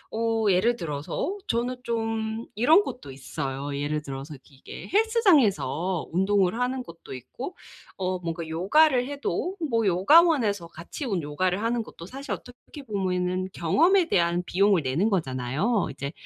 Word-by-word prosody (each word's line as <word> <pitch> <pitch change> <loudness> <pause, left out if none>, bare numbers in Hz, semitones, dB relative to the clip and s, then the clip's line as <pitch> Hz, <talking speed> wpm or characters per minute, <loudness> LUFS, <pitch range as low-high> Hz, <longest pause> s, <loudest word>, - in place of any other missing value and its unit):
어 225 -1 0
예를 220 +7 +3
들어서 165 - -3
저는 245 +2 -1
좀 225 -1 -2
이런 310 - +5
것도 250 - -8
있어요. 135 +1 -5
예를 145 +1 -2
들어서 140 +2 -7
이게 135 -2 -11
헬스장에서 240 - +2
운동을 190 +1 +2
하는 255 +1 -1
것도 165 - -10
있고 240 - -8 0.4
어 185 -1 -2
뭔가 165 -1 -4
요가를 250 - +3
해도 285 +6 -3 0.2
뭐 230 -3 +2
요가원에서 210 - +4
같이 170 - -8
운 195 - -1
요가를 180 +7 -1
하는 235 +1 0
것도 170 - -10
사실 270 +8 -8
어떻게 250 +4 -8
보면은 185 -4 -1
경험에 335 - +3
대한 175 - +1
비용을 195 -2 +3
내는 155 +12 +1
거잖아요 155 - 0
이제. 140 +1 -5
195 Hz, 315 characters per minute, -26 LUFS, 165-245 Hz, 0.4 s, 이런